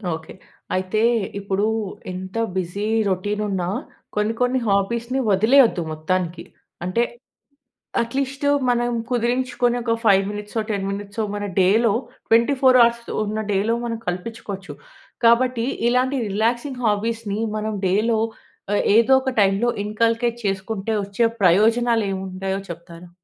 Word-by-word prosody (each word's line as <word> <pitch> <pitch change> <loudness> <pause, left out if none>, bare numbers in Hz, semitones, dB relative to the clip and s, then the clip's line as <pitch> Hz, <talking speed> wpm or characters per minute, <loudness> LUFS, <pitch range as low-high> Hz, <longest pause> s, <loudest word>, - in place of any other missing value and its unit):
Okay. 160 0 -10 0.4
అయితే 185 +3 -1 0.4
ఇప్పుడూ 200 0 -1 0.5
ఎంత 185 +2 -7 0.2
బిజీ 185 +3 -3 0.3
రొటీన్ 205 +3 -1
ఉన్నా 185 -3 -1 0.5
కొన్ని, 210 +2 +1
కొన్ని 250 +1 +2
హాబీస్‌ని 235 +6 0
వదిలేయొద్దు 220 +1 +5
మొత్తానికి. 170 +2 -2 0.4
అంటే, 205 +6 +1 1.0
అట్లీస్టు 275 +4 -1 0.2
మనం 240 0 +1 0.2
కుదిరించుకొని 245 0 0
ఒక, 230 -1 +1
5 195 -2 +5
మినిట్సో, 210 +2 -4
10 195 -2 -2
మినిట్సో, 205 +2 -4
మన 205 - -4 0.2
డేలో 205 +4 +4 0.4
24 255 +3 +4
అవర్స్ 235 0 +3 0.2
ఉన్న 215 +1 -3
డేలో 205 +4 +1
మనం 230 -1 -2
కల్పించుకోవచ్చు. 195 +1 -5 0.5
కాబట్టి 235 0 +4 0.2
ఇలాంటి 255 +3 +1
రిలాక్సింగ్ 235 +6 -1
హాబీస్‌ని 215 0 -1 0.2
మనం 215 0 -2
డేలో 220 +4 +2 0.5
ఆహ్, - - +2
ఏదో 230 +3 +5
ఒక 265 - -1
టైమ్‌లో 195 +4 +2 0.2
ఇన్కల్కెట్ 230 +2 0
చేసుకుంటే, 195 +2 -2
వచ్చే 200 +4 -1 0.2
ప్రయోజనాలు 225 +5 +4
ఏమి 190 - -3
ఉంటాయో 190 +1 -3
చెప్తారా? 170 +1 -10
215 Hz, 120 wpm, -22 LUFS, 195-235 Hz, 1.0 s, వదిలేయొద్దు